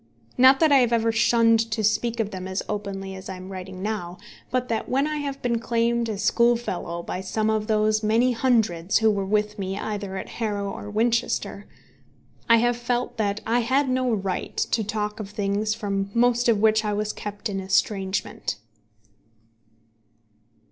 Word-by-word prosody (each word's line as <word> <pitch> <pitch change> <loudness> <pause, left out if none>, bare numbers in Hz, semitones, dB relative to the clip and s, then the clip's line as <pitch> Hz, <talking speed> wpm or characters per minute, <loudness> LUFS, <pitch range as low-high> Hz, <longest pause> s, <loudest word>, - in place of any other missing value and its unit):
Not 260 +2 +6
that 315 -2 +5
I 280 - +7
have 245 -3 +3
ever 230 0 +2
shunned 230 0 +4
to 220 -1 -2
speak 230 +3 +1
of 215 -2 -1
them 185 -1 -6
as 190 0 -3
openly 195 -2 -4
as 190 0 -9
I 190 - -5
am 185 +1 -9
writing 185 0 -7
now, 185 -5 -3 0.3
but 250 0 -1
that 225 -2 -2
when 270 +3 +2
I 305 0 -2
have 280 -2 -4
been 235 -2 +1
claimed 235 0 0
as 205 -2 -3
schoolfellow 230 -8 +1
by 180 - -4
some 215 +3 -1
of 215 -1 -1
those 215 0 +2
many 225 +4 +3
hundreds 225 -8 +1
who 220 -1 +4
were 200 -2 -2
with 210 +1 0
me 195 0 -3
either 200 -2 -4
at - - -5
Harrow 205 -3 -2
or 205 - -7
at 210 - -9
Winchester, 230 +2 0 0.8
I 230 - +7
have 240 +1 +2
felt 240 +1 -2
that 205 -1 -1
I 235 +2 +2
had 260 +4 +1
no 255 -1 +1
right 195 -4 -3
to 225 - 0
talk 210 +1 -3
of 205 -2 -6
things 210 +1 -1
from 200 -3 -2
most 240 0 +3
of 225 - +4
which 220 +1 +3
I 210 -1 -1
was 210 +1 -2
kept 205 +1 -5
in 195 -2 -3
estrangement. 190 - -1
215 Hz, 180 wpm, -24 LUFS, 200-235 Hz, 0.8 s, I